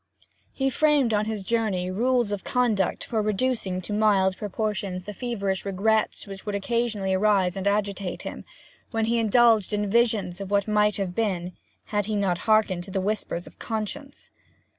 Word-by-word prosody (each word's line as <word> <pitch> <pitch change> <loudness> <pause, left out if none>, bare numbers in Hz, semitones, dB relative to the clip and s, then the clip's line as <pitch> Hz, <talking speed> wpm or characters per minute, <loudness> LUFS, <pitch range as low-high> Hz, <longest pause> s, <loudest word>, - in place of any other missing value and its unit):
He 270 0 -1
framed 285 -3 +3
on 210 0 +2
his 215 -2 -3
journey 195 -5 0
rules 240 +2 +1
of 205 -2 -3
conduct 225 -7 +1
for 220 -2 -1
reducing 210 -3 -1
to 210 - -4
mild 200 -3 +3
proportions 205 -2 -3
the 210 - -7
feverish 200 -5 -2
regrets 210 +3 0
which 195 -1 -9
would 205 -1 -3
occasionally 210 -2 -1
arise 190 -2 +2
and 195 0 -2
agitate 200 -2 -1
him, - - -6 0.5
when 225 -1 0
he 235 +1 +1
indulged 225 -2 +4
in 210 0 0
visions 205 -4 +1
of 195 - -5
what 200 0 +1
might 210 0 +2
have 195 -3 -2
been 185 -4 -1 0.3
had 205 -1 -2
he 215 - -1
not 190 -4 0
hearkened 210 -5 +3
to - - -11
the 190 - -1
whispers 190 -3 -2
of - - -14
conscience. 240 +6 -5
210 Hz, 170 wpm, -25 LUFS, 195-225 Hz, 0.5 s, indulged